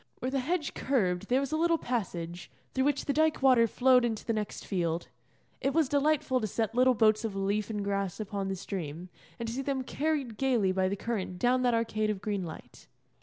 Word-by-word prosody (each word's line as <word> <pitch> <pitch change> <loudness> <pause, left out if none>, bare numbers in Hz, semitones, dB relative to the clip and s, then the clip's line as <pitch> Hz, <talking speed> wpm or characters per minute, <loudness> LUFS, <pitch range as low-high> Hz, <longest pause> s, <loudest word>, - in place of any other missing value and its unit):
Where 255 - -3
the 275 - +1
hedge 310 +3 -1
curved 200 -8 0
there 255 +2 +4
was 275 - -3
a 310 - +1
little 335 +1 +3
passage, 175 - -4 0.2
through 265 0 +1
which 285 -1 +1
the 280 - 0
dyke 315 -2 +2
water 250 -4 +6
flowed 250 +2 +4
into 225 -3 -2
the 230 - 0
next 215 -2 -4
field. 170 -3 -1 0.5
It 275 +2 0
was 320 -4 +4
delightful 285 -2 +1
to 215 - -1
set 220 +1 -2
little 255 +1 +4
boats 215 0 +3
of 220 -3 -3
leaf 200 +2 -1
and 210 -2 -2
grass 200 -2 -2
upon 200 -2 -3
the 195 - -2
stream, 180 -3 -6 0.3
and 235 - -4
to 225 - -3
see 265 - -2
them 270 -1 -2
carried 280 -5 -2
gaily 240 -8 +2
by 185 0 +1
the 200 - -1
current 195 -4 -3
down 250 +6 +2
that 245 -2 +3
arcade 215 -2 0
of 210 -2 -1
green 200 -1 -2
light. 160 -2 -10
230 Hz, 220 wpm, -30 LUFS, 195-265 Hz, 0.5 s, water